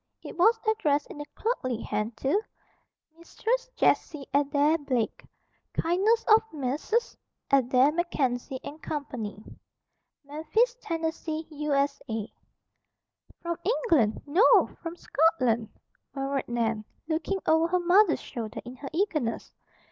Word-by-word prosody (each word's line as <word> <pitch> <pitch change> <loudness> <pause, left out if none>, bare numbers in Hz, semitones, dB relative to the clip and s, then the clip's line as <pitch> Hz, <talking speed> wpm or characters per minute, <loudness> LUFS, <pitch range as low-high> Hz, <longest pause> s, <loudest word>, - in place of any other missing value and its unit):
It - - -8
was 445 +6 +4
addressed 295 -10 +2
in 295 - -7
a - - -6
clerkly 255 - -1
hand 215 +2 -3
to, 285 - +1 0.8
"MISTRESS - - -2
JESSIE 295 -4 +1
ADAIR 290 +3 +3
BLAKE, 255 -6 -2 0.5
"KINDNESS 400 +7 +2
OF 440 0 +7
MESSRS. 300 - -1 0.4
ADAIR 265 +1 +4
MACKENZIE 270 -6 -1 0.2
& - - -36
CO. 295 -2 -3 1.2
"MEMPHIS, 320 - 0
TENN., 330 -1 -3 0.5
U.S.A." 280 -7 -1 1.1
"From 340 -1 -2
England. 330 - +2
No! 340 +11 +4
From 335 0 -5
Scotland," 255 -11 +1 0.5
murmured 275 0 -2
Nan, 230 -2 -1 0.2
looking 325 +4 -1
over 320 +1 +4
her 365 +1 +1
mother's 355 0 +4
shoulder 225 -3 -6
in 250 +1 -9
her 275 0 -7
eagerness. 315 - -1
295 Hz, 110 wpm, -27 LUFS, 255-345 Hz, 1.2 s, OF